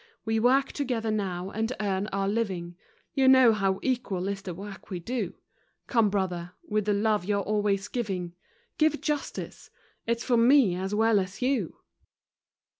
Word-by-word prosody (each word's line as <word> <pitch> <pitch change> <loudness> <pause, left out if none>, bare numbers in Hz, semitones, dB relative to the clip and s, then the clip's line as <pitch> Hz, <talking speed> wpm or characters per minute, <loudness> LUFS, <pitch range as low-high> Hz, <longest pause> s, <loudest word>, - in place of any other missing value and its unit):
We 225 0 +1
work 265 +4 +3
together 240 -6 -2
now 190 -3 -2
and 225 +2 -2
earn 200 -1 -1
our 195 -1 -1
living, 190 -5 -2 0.4
You 270 -2 +3
know 260 -3 +7
how 195 -2 0
equal 220 -8 -1
is 200 0 -3
the 180 -3 -6
work 200 +2 -9
we 185 -3 -4
do; 205 0 -3 0.5
Come, 230 -4 +3
brother, 180 -3 -2
with 210 -1 0
the 210 - +2
love 210 -1 +1
you're 200 +1 0
always 205 -1 0
giving, 190 -7 -3 0.5
Give 310 -1 +3
justice! 300 -2 -4 0.4
It's 235 0 0
for 245 -2 +2
me 240 -4 +5
as 190 +3 -2
well 220 -1 +4
as 195 +5 -4
you. 250 - 0
210 Hz, 160 wpm, -27 LUFS, 190-235 Hz, 0.5 s, know